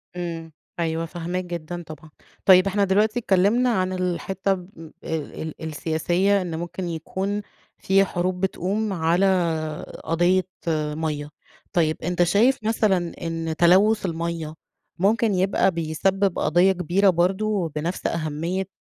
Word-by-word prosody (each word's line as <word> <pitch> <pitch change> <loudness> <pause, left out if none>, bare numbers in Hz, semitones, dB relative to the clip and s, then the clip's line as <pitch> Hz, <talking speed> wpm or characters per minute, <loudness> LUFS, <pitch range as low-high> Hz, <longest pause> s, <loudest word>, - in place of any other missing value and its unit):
امم، 165 -2 -5 0.3
أيوه 165 0 -1
فاهماك 175 +2 -4
جدًا 175 0 -6
طبعًا، 155 0 -11 0.4
طيب 185 0 +7
إحنا 200 +1 +1
دلوقتي 210 +4 +2
اتكلمنا 215 +4 +3
عن 185 -5 0
الحتة 185 +1 -1
ال 175 -4 -10
ال 160 0 -5
السياسية 175 +5 +1
إن 170 -3 -4
ممكن 175 +1 -5
يكون 190 +5 -3 0.4
في 195 +1 +3
حروب 180 0 -2
بتقوم 195 +2 -1
على 170 +2 +2 0.8
قضية 175 +3 +2 0.5
مَيَّة، 150 -2 -3 0.4
طيب 160 -4 +2
أنت 175 +1 +1
شايف 225 +10 +3
مثلًا 205 -6 +1
إن 165 -1 -3
تلوث 195 +5 +4
المَيَّة 165 -2 -3 0.4
ممكن 215 +3 +2
يبقى 190 +1 +2
بيسبب 180 +4 0
قضية 175 +5 +4
كبيرة 185 +2 +2
برضه، 190 +1 +1
بنفس 165 +4 -2
أهمية 170 +4 -2
180 Hz, 120 wpm, -23 LUFS, 165-195 Hz, 0.8 s, طيب